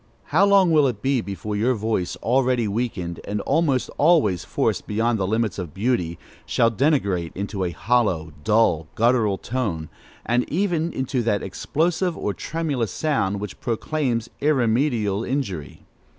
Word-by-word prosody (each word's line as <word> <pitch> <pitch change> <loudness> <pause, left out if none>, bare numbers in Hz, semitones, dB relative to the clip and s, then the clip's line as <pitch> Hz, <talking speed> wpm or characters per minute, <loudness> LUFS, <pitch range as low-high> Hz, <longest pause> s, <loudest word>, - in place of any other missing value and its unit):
How 175 +7 +3
long 195 -3 +5
will 150 -3 +5
it 115 -5 -4
be 135 -2 +2
before 105 +1 -5
your 120 +5 +2
voice, 105 -5 -1
already 125 -1 +2
weakened, 100 -6 -3
and 105 +1 -3
almost 140 -3 +1
always 140 - +4
forced - - -1
beyond 110 +2 0
the 95 - 0
limits 110 -1 0
of 85 -3 -6
beauty, 95 -6 0 0.3
shall 115 0 +2
degenerate 100 - +1
into 100 0 -3
a 90 - 0
hollow, 85 -3 0
dull, 90 -6 +2
guttural 115 -4 +2
tone, 100 -12 -3 0.4
and 120 +1 0
even 170 -2 0
into 130 -1 -1
that 105 -3 0
explosive 165 - -1
or 105 - -2
tremulous 145 - -2
sound, 105 -11 0
which 105 -2 -7
proclaims 120 -1 -1
irremediable 120 -6 +1
injury? 110 - -4
115 Hz, 145 wpm, -23 LUFS, 100-135 Hz, 0.4 s, long